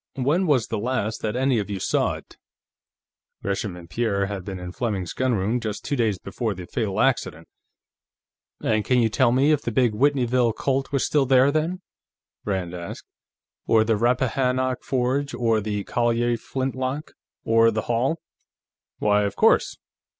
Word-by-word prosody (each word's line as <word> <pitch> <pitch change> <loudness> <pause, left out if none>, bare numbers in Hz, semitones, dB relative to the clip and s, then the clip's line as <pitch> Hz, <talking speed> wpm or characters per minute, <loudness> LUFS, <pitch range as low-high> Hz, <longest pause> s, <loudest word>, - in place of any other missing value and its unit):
When 150 +8 +1
was 135 -7 +3
the - - -2
last 115 -1 -2
that 110 +1 -2
any 130 -2 +2
of 105 - -4
you 100 -2 -3
saw - - +1
it?" - - -13 1.1
Gresham 100 -1 -2
and 85 -1 -11
Pierre 100 +1 0
had 100 -2 -5
been 95 0 -6
in 90 0 -6
Fleming's 100 -5 -3
gunroom 120 -3 0
just 110 -3 -5
two 145 - -1
days 110 -6 +1
before 105 +3 -3
the 90 -1 -8
fatal 105 -2 -2
"accident." - - 0 1.2
"And 110 -1 +1
can 125 - +2
you 115 -2 +3
tell 125 +2 +3
me 135 +5 +3
if 150 -2 +2
the 120 - -3
big 120 0 +3
Whitneyville 125 -2 +2
Colt 135 +4 -1
was 140 -2 +1
still 145 -3 +2
there, 130 +1 +5
then?" 165 +5 -1 0.6
Rand 95 -4 -2
asked. 85 -1 -7 0.6
"Or 110 -1 +5
the 110 0 +1
Rappahannock 125 +2 +1
Forge, 135 +2 -1
or 115 -2 +1
the 105 -1 -3
Collier 120 +1 +1
flintlock, 130 +4 -3 0.3
or 115 0 +4
the 110 -1 -2
Hall?" 120 +8 0 0.8
"Why, 105 0 +2
of 100 0 -3
course - - +3
120 Hz, 165 wpm, -24 LUFS, 105-130 Hz, 1.2 s, there